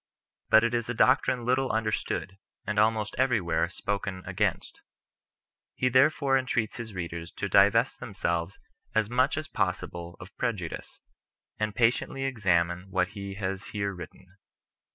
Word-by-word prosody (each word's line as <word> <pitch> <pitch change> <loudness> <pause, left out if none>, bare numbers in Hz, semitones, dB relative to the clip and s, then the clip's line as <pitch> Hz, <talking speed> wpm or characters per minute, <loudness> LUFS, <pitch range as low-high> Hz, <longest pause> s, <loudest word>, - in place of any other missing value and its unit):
But 110 - +7
it 115 0 +1
is 120 -1 -1
a 120 - -2
doctrine 130 -1 +3
little 130 +1 +2
understood, 110 -3 -2 0.3
and 105 0 0
almost 110 0 +2
everywhere 115 -11 +2
spoken 100 -2 -3
against. - - -2 0.9
He 125 - +1
therefore 135 +1 +4
entreats 125 -4 -1
his 115 -4 -7
readers 85 -1 -5
to - - -3
divest - - +4
themselves 85 +2 -2 0.4
as 110 0 +1
much 130 +4 +2
as 155 0 -3
possible 90 - -3
of 90 - -12
pre 120 - +1
judice, 90 -6 -7 0.6
and 105 -1 -1
patiently 120 +3 +1
examine 90 -7 +1
what 95 -1 +1
he 100 -1 -7
has 95 -1 -3
here 100 -1 -1
written. 90 +1 -12
105 Hz, 140 wpm, -28 LUFS, 95-120 Hz, 0.9 s, But